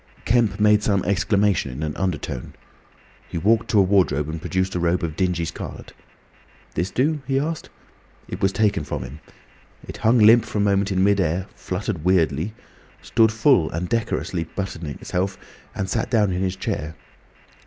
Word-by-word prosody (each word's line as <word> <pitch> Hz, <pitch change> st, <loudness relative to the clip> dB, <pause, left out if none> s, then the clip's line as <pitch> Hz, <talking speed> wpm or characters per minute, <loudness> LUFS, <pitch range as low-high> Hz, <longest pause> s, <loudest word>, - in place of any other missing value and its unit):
Kemp 110 Hz, -4 st, +2 dB
made 105 Hz, 0 st, +5 dB
some 100 Hz, -3 st, +1 dB
exclamation 100 Hz, -4 st, +1 dB
in 70 Hz, +5 st, -6 dB
an 75 Hz, -1 st, -3 dB
undertone. 80 Hz, -9 st, -3 dB, 0.7 s
He -, -, -4 dB
walked 110 Hz, +7 st, +2 dB
to 110 Hz, -, +2 dB
a 100 Hz, -, +7 dB
wardrobe 90 Hz, -7 st, +2 dB
and 80 Hz, 0 st, -5 dB
produced 95 Hz, +2 st, -1 dB
a 90 Hz, -, -1 dB
robe 85 Hz, +1 st, +1 dB
of 80 Hz, -2 st, -3 dB
dingy 90 Hz, -2 st, 0 dB
scarlet. 80 Hz, -, -8 dB, 0.8 s
"This 90 Hz, +4 st, -1 dB
do?" 150 Hz, +6 st, 0 dB
he 135 Hz, -1 st, +1 dB
asked. 155 Hz, +2 st, -3 dB, 0.6 s
It 90 Hz, -, -7 dB
was 95 Hz, -1 st, +3 dB
taken 105 Hz, -1 st, +1 dB
from -, -, -4 dB
him. 65 Hz, +5 st, -9 dB, 0.7 s
It -, -, -7 dB
hung 115 Hz, +3 st, +3 dB
limp 115 Hz, +1 st, +7 dB
for 110 Hz, -, -5 dB
a -, -, +2 dB
moment 100 Hz, 0 st, +2 dB
in 95 Hz, 0 st, +2 dB
mid 100 Hz, 0 st, +3 dB
air, 90 Hz, +1 st, 0 dB
fluttered 95 Hz, -3 st, -4 dB
weirdly, 90 Hz, +1 st, +1 dB, 0.5 s
stood 110 Hz, -1 st, +3 dB
full 115 Hz, -, +3 dB
and 85 Hz, +3 st, -3 dB
decorous 115 Hz, +2 st, -1 dB, 0.2 s
buttoning 85 Hz, -7 st, -4 dB
itself, 95 Hz, +2 st, -3 dB, 0.4 s
and 95 Hz, -, -2 dB
sat 115 Hz, +4 st, -1 dB
down 105 Hz, -5 st, +2 dB
in 90 Hz, 0 st, -2 dB
his 95 Hz, -1 st, -1 dB
chair. 80 Hz, -4 st, -4 dB
95 Hz, 175 wpm, -22 LUFS, 85-105 Hz, 0.8 s, a